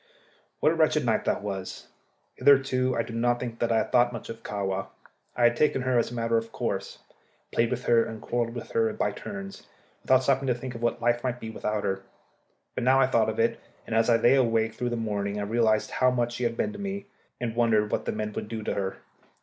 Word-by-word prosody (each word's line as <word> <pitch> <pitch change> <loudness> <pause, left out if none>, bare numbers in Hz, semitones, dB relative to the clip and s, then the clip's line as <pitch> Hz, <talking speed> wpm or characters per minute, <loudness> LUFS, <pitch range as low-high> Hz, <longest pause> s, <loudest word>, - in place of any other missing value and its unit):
What - - +5
a - - -1
wretched - - +2
night - - +1
that - - 0
was! 95 -2 -5 0.5
Hitherto 130 -2 +3
I 115 - +1
do 115 - -9
not 120 +1 +1
think 115 -2 -5
that 120 - +1
I 115 - +3
had - - -1
thought 120 0 +4
much 115 -3 -7
of 115 0 -7
Kahwa. 95 -3 -3 0.5
I 120 - 0
had 120 0 +5
taken 135 -1 +2
her 130 -1 +2
as - - 0
a 120 - -7
matter 115 -1 +1
of 115 0 -10
course, - - -3 0.5
played 115 0 +2
with 125 0 -3
her 115 -1 +4
and 110 -1 -6
quarrelled 120 +1 -2
with 120 - -7
her 115 -1 +2
by - - 0
turns, 100 0 -8 0.3
without 130 0 +3
stopping 135 0 +1
to 125 - +2
think 125 +1 -6
what 120 -1 -2
life 120 0 +2
might 125 -1 -2
be 110 -1 -6
without 105 -1 -2
her. 95 0 -1 0.7
But - - -3
now 130 +2 +5
I 135 - +6
thought 115 -4 +2
of 110 - -4
it, 115 +1 +1 0.3
and 115 - -3
as 115 +1 +3
I 115 - +6
lay 120 +2 +5
awake 115 -4 +2
through 125 - -2
the 120 - -2
morning 105 -2 -2
I - - -2
realized 110 0 +1
how 130 - +3
much 120 -1 0
she 120 0 -2
had 115 0 -1
been 215 - -1
to 205 - -9
me, 200 0 -4 0.3
and 115 -2 -3
wondered 110 -3 +2
what - - -1
the - - 0
men 105 0 -3
would - - -4
do 110 -1 -5
with - - -2
her. 95 -1 -2
115 Hz, 240 wpm, -27 LUFS, 110-125 Hz, 0.7 s, I